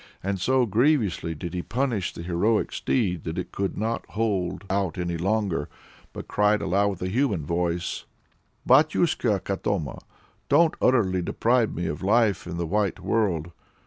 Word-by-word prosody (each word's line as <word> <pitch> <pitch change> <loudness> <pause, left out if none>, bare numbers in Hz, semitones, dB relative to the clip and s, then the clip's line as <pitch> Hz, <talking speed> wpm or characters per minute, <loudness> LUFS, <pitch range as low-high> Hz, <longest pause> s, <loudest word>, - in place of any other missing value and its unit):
And 95 -1 -2
so 130 +3 +3
grievously 110 - +1
did 85 +3 -6
he 90 - -2
punish 120 -3 -1
the 85 - -8
heroic 90 +6 +1
steed 90 - -1
that 80 +1 -4
it 90 - -4
could 100 -1 -3
not 115 +2 -1
hold 105 -4 -1
out 95 -3 -1
any 85 -1 -2
longer, 95 0 -1 0.4
but - - -8
cried 105 0 +2
aloud 100 +3 +1
with 95 -3 -6
a - - -1
human 100 - 0
voice 85 +1 -2 0.6
"Batyushka 150 - +3
Katoma! 95 -6 -2 0.5
don't 160 +3 +5
utterly 100 -8 +3
deprive 115 +6 +1
me 85 - -2
of 75 - -3
life 105 -2 +2
in 85 -1 -5
the 85 - -1
white 100 +2 0
world! 90 -7 0
100 Hz, 155 wpm, -25 LUFS, 90-115 Hz, 0.6 s, don't